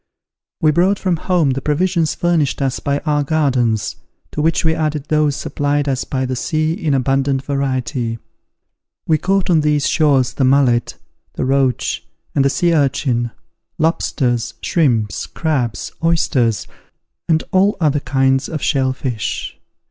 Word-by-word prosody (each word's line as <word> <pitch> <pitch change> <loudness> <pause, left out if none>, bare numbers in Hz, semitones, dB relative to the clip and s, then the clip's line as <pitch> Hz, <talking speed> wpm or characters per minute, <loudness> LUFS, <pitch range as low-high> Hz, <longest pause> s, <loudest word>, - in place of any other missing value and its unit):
We 155 - +4
brought 185 +6 +2
from 185 -3 0
home 170 -4 +1
the 135 +1 -2
provisions 165 +2 0
furnished 170 -5 +1
us 135 -2 -1
by 140 0 -1
our 150 -1 +1
gardens, 130 -9 0 0.3
to 150 - -2
which 165 +2 +1
we 160 - +3
added 155 -3 -2
those 150 -2 +2
supplied 145 0 -1
us 130 -2 -1
by 130 -1 -2
the 130 0 -2
sea 155 +5 0
in 160 -6 -1
abundant 135 +1 +1
variety. 130 -4 -2 0.9
We 155 -2 +2
caught 190 +2 +1
on 160 -2 +4
these 150 -1 +1
shores 135 -5 +2
the 135 - -1
mullet, 130 -3 +2 0.4
the - - -2
roach, 130 -2 0 0.3
and 140 - +2
the 140 - +3
sea 170 +4 +1
urchin, 135 -5 +1 0.5
lobsters, 130 -7 0
shrimps, 120 - 0
crabs, 135 -8 -2
oysters, 135 -9 +1 0.6
and 160 -1 +3
all 195 +1 +3
other 150 -3 +2
kinds 135 -1 +1
of 155 -4 -4
shell 130 -3 +1
fish. 125 -5 -4
140 Hz, 145 wpm, -18 LUFS, 130-160 Hz, 0.9 s, We